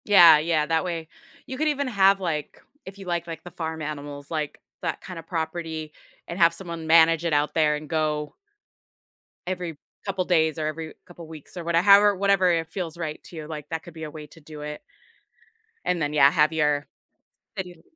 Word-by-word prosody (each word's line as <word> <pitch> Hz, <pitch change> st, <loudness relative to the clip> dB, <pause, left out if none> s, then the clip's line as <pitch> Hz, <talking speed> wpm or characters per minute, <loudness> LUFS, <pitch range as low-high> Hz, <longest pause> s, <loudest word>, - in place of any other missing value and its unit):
Yeah, 170 Hz, -7 st, +8 dB
yeah, 155 Hz, -1 st, +1 dB
that 160 Hz, +1 st, +1 dB
way 170 Hz, -3 st, -4 dB, 0.4 s
you 260 Hz, -, -6 dB
could 310 Hz, +2 st, +1 dB
even 285 Hz, -2 st, 0 dB
have, 195 Hz, -4 st, +4 dB
like, 160 Hz, -5 st, -3 dB, 0.2 s
if 190 Hz, +1 st, -10 dB
you 195 Hz, -, -10 dB
like, 175 Hz, -1 st, -2 dB
like, 165 Hz, -1 st, -7 dB
the 175 Hz, -, -10 dB
farm 160 Hz, -1 st, -5 dB
animals 145 Hz, -1 st, -6 dB
like 155 Hz, -2 st, -3 dB, 0.2 s
that -, -, -3 dB
kinda 180 Hz, -3 st, -8 dB
property 160 Hz, -2 st, -4 dB, 0.3 s
and 170 Hz, -, -6 dB
have 170 Hz, -1 st, +6 dB
someone 170 Hz, -3 st, -6 dB
manage 165 Hz, 0 st, +5 dB
it 165 Hz, -, +1 dB
out 145 Hz, 0 st, +1 dB
there 155 Hz, -2 st, +3 dB
and 150 Hz, 0 st, -7 dB
go 150 Hz, -2 st, -1 dB, 1.1 s
every 180 Hz, -4 st, -4 dB, 0.3 s
couple 190 Hz, -2 st, -1 dB
days 160 Hz, -3 st, +2 dB
or 155 Hz, -, -2 dB
every 155 Hz, +1 st, -4 dB
couple 175 Hz, -3 st, -12 dB
weeks 155 Hz, 0 st, -11 dB
or 175 Hz, -, -5 dB
whate 170 Hz, 0 st, -1 dB
however, 200 Hz, +3 st, +6 dB
whatever 195 Hz, -1 st, +3 dB
it 165 Hz, -1 st, 0 dB
feels 170 Hz, -3 st, -5 dB
right 155 Hz, -3 st, -5 dB
to -, -, -13 dB
you, 155 Hz, -2 st, -7 dB
like, 150 Hz, -2 st, -7 dB
that 160 Hz, 0 st, -4 dB
could 175 Hz, -, -12 dB
be 160 Hz, 0 st, -8 dB
a 155 Hz, -, -6 dB
way 150 Hz, 0 st, -9 dB
to 165 Hz, -, -17 dB
do 150 Hz, -1 st, -11 dB
it 150 Hz, 0 st, -6 dB, 1.0 s
and 180 Hz, -2 st, 0 dB
then, 145 Hz, 0 st, -1 dB
yeah, 140 Hz, -2 st, +7 dB
have 155 Hz, +2 st, +3 dB
your 150 Hz, -2 st, +1 dB, 0.7 s
city 180 Hz, -4 st, -6 dB
165 Hz, 200 wpm, -25 LUFS, 155-180 Hz, 1.1 s, Yeah